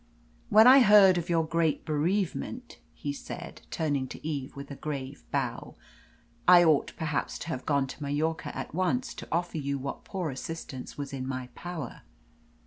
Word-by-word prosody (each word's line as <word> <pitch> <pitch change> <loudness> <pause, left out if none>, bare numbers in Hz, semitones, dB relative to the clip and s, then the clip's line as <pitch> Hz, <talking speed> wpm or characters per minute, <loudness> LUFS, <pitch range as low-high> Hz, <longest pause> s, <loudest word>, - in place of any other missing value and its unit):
"When 215 +1 +7
I 260 +2 +10
heard 205 -6 +7
of 170 +1 -6
your 165 -2 +2
great 165 -1 0
bereavement," 190 +10 -2 0.2
he 145 - -4
said, - - -8
turning 145 -5 -1
to 150 - -8
Eve 145 -3 -4
with 140 0 -8
a - - -5
grave 140 -2 -5
bow, - - -3 0.7
"I 175 -1 +9
ought 155 -4 +3
perhaps 150 -3 -2
to - - -7
have 130 -6 -4
gone 140 -2 +2
to 135 - -10
Mallorca 150 +3 -2
at - - -5
once 235 +9 0
to - - -9
offer 170 0 -1
you 140 -1 -2
what 140 +1 -5
poor 180 -6 -3
assistance 135 -1 -7
was 140 -1 -5
in 130 -1 -4
my 130 -1 -4
power. 170 -8 -6
155 Hz, 170 wpm, -29 LUFS, 140-175 Hz, 0.7 s, I